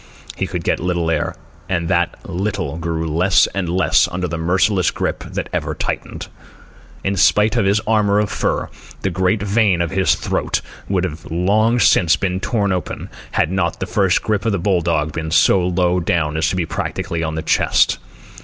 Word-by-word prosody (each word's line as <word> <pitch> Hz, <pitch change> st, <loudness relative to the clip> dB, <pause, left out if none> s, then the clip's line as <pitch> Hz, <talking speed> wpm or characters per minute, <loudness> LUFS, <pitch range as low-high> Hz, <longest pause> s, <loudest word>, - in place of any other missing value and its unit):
He -, -, -2 dB
could -, -, -4 dB
get -, -, 0 dB
little 85 Hz, -2 st, -1 dB
air, 75 Hz, -2 st, -1 dB, 0.3 s
and 85 Hz, -3 st, -1 dB
that 85 Hz, 0 st, +1 dB
little 95 Hz, -5 st, -3 dB
grew 85 Hz, -1 st, -2 dB
less 85 Hz, +5 st, +3 dB
and 95 Hz, -3 st, -2 dB
less 90 Hz, +1 st, +3 dB
under 90 Hz, +1 st, -2 dB
the 85 Hz, -, -4 dB
merciless 90 Hz, +3 st, +2 dB
grip -, -, -3 dB
that -, -, -4 dB
ever -, -, -2 dB
tightened. -, -, -4 dB, 0.8 s
In 100 Hz, +1 st, 0 dB
spite 105 Hz, +4 st, +3 dB
of -, -, +2 dB
his 100 Hz, +2 st, +3 dB
armour 105 Hz, -2 st, +2 dB
of 105 Hz, 0 st, 0 dB
fur, -, -, -1 dB, 0.3 s
the 95 Hz, -, 0 dB
great 95 Hz, +3 st, 0 dB
vein 100 Hz, -3 st, +2 dB
of 85 Hz, -1 st, -1 dB
his 95 Hz, -1 st, +2 dB
throat -, -, -1 dB, 0.3 s
would 95 Hz, -2 st, +1 dB
have 80 Hz, -3 st, -5 dB
long 105 Hz, +8 st, +2 dB
since 85 Hz, -7 st, +4 dB
been 95 Hz, -1 st, -2 dB
torn 100 Hz, 0 st, 0 dB
open, 90 Hz, -3 st, -4 dB, 0.2 s
had 80 Hz, -, +1 dB
not 95 Hz, -3 st, -1 dB
the -, -, -2 dB
first 95 Hz, 0 st, +1 dB
grip 105 Hz, -2 st, 0 dB
of 110 Hz, -2 st, 0 dB
the -, -, +1 dB
bull 90 Hz, 0 st, +1 dB
dog 80 Hz, -2 st, 0 dB
been 80 Hz, +1 st, -4 dB
so 90 Hz, +3 st, +4 dB
low 90 Hz, 0 st, +1 dB
down 80 Hz, -3 st, 0 dB
as 80 Hz, 0 st, +1 dB
to -, -, -2 dB
be 90 Hz, -2 st, 0 dB
practically 85 Hz, +1 st, -3 dB
on 80 Hz, -1 st, -2 dB
the 80 Hz, -, -3 dB
chest. -, -, +2 dB
90 Hz, 190 wpm, -19 LUFS, 85-100 Hz, 0.8 s, since